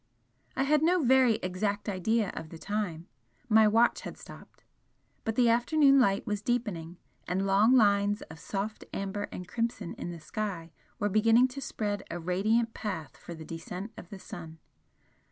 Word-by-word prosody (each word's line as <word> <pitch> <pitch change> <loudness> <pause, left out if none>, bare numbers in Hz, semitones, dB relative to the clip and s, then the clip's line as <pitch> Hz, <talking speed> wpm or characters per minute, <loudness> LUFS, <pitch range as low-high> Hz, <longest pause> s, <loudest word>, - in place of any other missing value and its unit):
I 270 - +1
had 295 +2 +3
no 345 +1 +3
very 255 -2 +5
exact 200 +3 -2
idea 205 +2 0
of 160 - -6
the 165 - -9
time, 180 -4 -3 0.4
my 220 -2 +6
watch 230 +3 +3
had - - -8
stopped. - - -14 0.6
But 225 -2 -1
the 245 0 +4
afternoon 275 +4 +4
light 200 -5 +2
was 210 -3 -2
deepening, 200 -8 -2 0.3
and 190 +2 0
long 205 +6 +5
lines 205 -2 +3
of 160 - -12
soft 205 +2 -4
amber 200 +1 -3
and 180 - -7
crimson 230 -5 -3
in - - -4
the 170 -1 -7
sky 180 -2 -5 0.3
were 205 - 0
beginning 225 +5 +4
to 275 +2 -7
spread 205 -5 -3
a - - -4
radiant 215 +7 +1
path 185 -8 -5
for 170 - -9
the 160 -1 -10
descent 180 +6 -7
of 175 - -11
the 200 - -8
sun. 165 -3 -9
205 Hz, 170 wpm, -29 LUFS, 180-230 Hz, 0.6 s, my